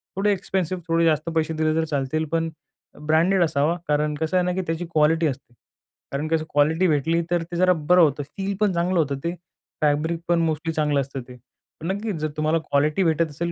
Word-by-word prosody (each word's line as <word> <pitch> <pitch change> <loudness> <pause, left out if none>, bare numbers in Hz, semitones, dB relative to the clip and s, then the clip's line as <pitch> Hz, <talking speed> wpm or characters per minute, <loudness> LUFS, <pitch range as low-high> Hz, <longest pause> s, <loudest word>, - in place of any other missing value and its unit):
थोडे 200 +2 +2
एक्सपेन्सिव, 185 -2 -2
थोडे 165 0 +2
जास्त 155 0 +1
पैसे 160 0 +1
दिले 155 0 +1
तर 160 0 +1
चालतील, 150 +1 -1
पण 165 +1 -1 0.6
ब्रँडेड 170 +4 +3
असावा. 155 +1 +1
कारण 150 0 +1
कसं 160 +4 -1
आहे 180 - +2
ना, 180 - 0
की 190 - -1
त्याची 165 +2 -2
क्वालिटी 160 +1 +3
असते. 130 -3 -6 0.6
कारण 140 +3 -2
कसं 160 0 0
क्वालिटी 160 +5 +2
भेटली, 160 +2 +1
तर 175 -1 +1
ते 170 +1 -8
जरा 185 +1 +4 0.2
बरं 180 0 +7
होतं. 145 -2 +2
फील 195 0 -2
पण 210 -3 +2
चांगलं 175 +1 +1
होतं 140 -3 0
ते, 170 +1 -1 0.5
फॅब्रिक 155 +3 +1
पण 170 0 +3
मोस्टली 160 0 -1
चांगलं 150 -2 +1
असतं 135 0 -6
ते. 125 - -11 0.5
पण 160 - -4
नक्कीच 205 0 -3
जर 155 - 0
तुम्हाला 155 +1 +2
क्वालिटी 150 +3 +1
भेटत 165 -1 +1
असेल 170 +4 -3
160 Hz, 205 wpm, -23 LUFS, 150-175 Hz, 0.6 s, बरं